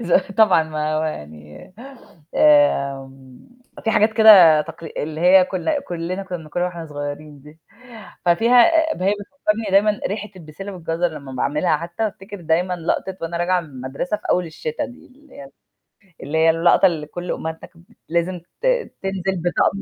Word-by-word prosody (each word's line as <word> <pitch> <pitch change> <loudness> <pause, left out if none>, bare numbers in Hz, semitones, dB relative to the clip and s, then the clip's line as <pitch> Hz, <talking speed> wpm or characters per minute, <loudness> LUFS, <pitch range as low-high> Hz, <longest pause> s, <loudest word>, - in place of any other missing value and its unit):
ز 175 - -4 0.2
طبعًا 210 -5 +4
ما 155 -1 -3
هو 155 - 0
يعني 75 - -8 0.6
آمم، 135 - +1 0.4
في 225 - +1
حاجات 215 0 +3
كده 200 -8 +8
تقل 160 +2 -9
اللي 155 +1 -4
هي 185 +2 +6
كنا 240 - -2
كلّنا 175 0 -5
كنا 185 -2 -6
بناكلها 160 +2 -3
وإحنا 170 -2 -7
صغيّرين 145 0 -7
دي، 150 +3 -16 0.7
ففيها 235 - +5 0.3
ب - - -7
هي 195 +2 +2
بتفكّرني 215 -1 -3
دايمًا 205 +2 +3
ريحة 210 +1 -4
البسِلّة 185 +4 -9
والجزر 175 -1 -2
لمّا 145 -4 -10
باعملها 150 +5 0
حتّى 170 +7 -4
بافتكر 200 -1 -7
دايمًا 175 +3 0
لقطة 180 +2 -3
وأنا 165 +1 -4
راجعة 180 +1 +1
من 165 - -12
المدرسة 135 +8 -4
في - - -20
أول 180 -1 +1
الشتا 155 -1 -5
دي، 245 - -12
اللي 290 +2 -21
هي 140 -1 -11 0.7
اللي 145 +3 -3
هي 160 +1 +4
اللقطة 165 +3 +4
اللي 160 -5 0
كلّ 175 +3 -6
أمهاتنا 160 0 -6
كان 170 -1 -21 0.3
لازم 170 +2 -1 0.2
ت - - -4 0.4
تنزل 190 -1 -2
بطقم 180 +2 +1
175 Hz, 165 wpm, -20 LUFS, 155-195 Hz, 0.7 s, كده